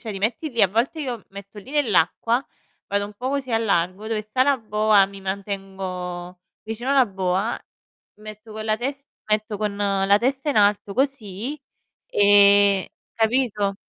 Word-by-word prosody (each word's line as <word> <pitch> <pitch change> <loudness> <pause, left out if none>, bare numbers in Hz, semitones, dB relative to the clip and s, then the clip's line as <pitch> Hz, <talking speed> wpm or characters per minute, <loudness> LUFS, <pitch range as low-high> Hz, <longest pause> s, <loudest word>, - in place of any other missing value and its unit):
cioè, 225 -4 -6
ti 195 - -5
metti 225 +9 -1
lì 235 -6 0
a 195 - +6
volte 235 - -1
io 255 -5 -3
mi - - -23
metto 200 +1 -11
lì 205 +6 -12
nell'acqua, 235 - +1 0.4
vado 200 0 0
un 205 - -11
po' 250 +5 -4
così 275 -2 -3
al 225 0 +1
largo 185 +1 0
dove 220 -1 -1
sta 215 +5 +1
la 280 0 +3
boa, 215 -3 +3
mi 195 0 -11
mantengo 190 -2 -5 0.2
vicino 230 +5 -3
la 270 -2 +5
boa, 190 +1 -1 0.6
metto 215 +1 -11
con 215 0 -6
la 215 0 +1
tes 275 +4 -4 0.2
metto 215 0 0
con 205 -1 -2
la 200 0 +2
testa 265 +5 -1
in 280 - -2
alto 205 -1 +3
così, 265 0 -2 0.5
e 200 -1 +5 0.2
capito? 220 -3 +1
210 Hz, 170 wpm, -23 LUFS, 200-240 Hz, 0.6 s, a